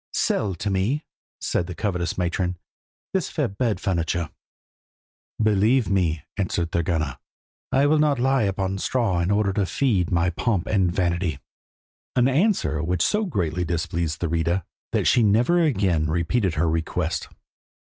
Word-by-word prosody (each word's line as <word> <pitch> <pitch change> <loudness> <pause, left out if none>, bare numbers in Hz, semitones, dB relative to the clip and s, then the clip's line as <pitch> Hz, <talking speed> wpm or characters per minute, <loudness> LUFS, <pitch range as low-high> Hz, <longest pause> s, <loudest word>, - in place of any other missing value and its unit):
"Sell 100 -4 0
to 100 +4 -3
me," 110 +11 0 0.3
said 85 - -1
the 90 - -6
covetous 90 -2 -2
matron, 90 0 -1 0.6
"this - - 0
fair - - 0
bed 105 -1 -1
furniture." 85 -4 -1 1.1
"Believe 110 +2 +3
me," 85 -5 +1
answered 85 -4 -1
Thorgunna, 80 -5 -1 0.5
"I 135 +2 +3
will 150 +1 +3
not 150 -2 +3
lie 135 +2 +2
upon 95 -1 -1
straw 110 -6 0
in 85 +2 0
order 100 -1 +2
to 100 -1 0
feed 105 -10 +1
thy 85 +1 +1
pomp 100 0 0
and 95 -4 +2
vanity;" 85 -4 0 0.8
an 125 0 +4
answer 135 - +1
which 85 +1 0
so 210 +1 +1
greatly 90 - -1
displeased 85 -1 -2
Thurida 85 +2 0 0.3
that - - 0
she 125 - +4
never 120 +11 +3
again 95 - +2
repeated 85 +3 0
her 80 +3 +1
request. 80 +1 -1
95 Hz, 145 wpm, -24 LUFS, 85-110 Hz, 1.1 s, an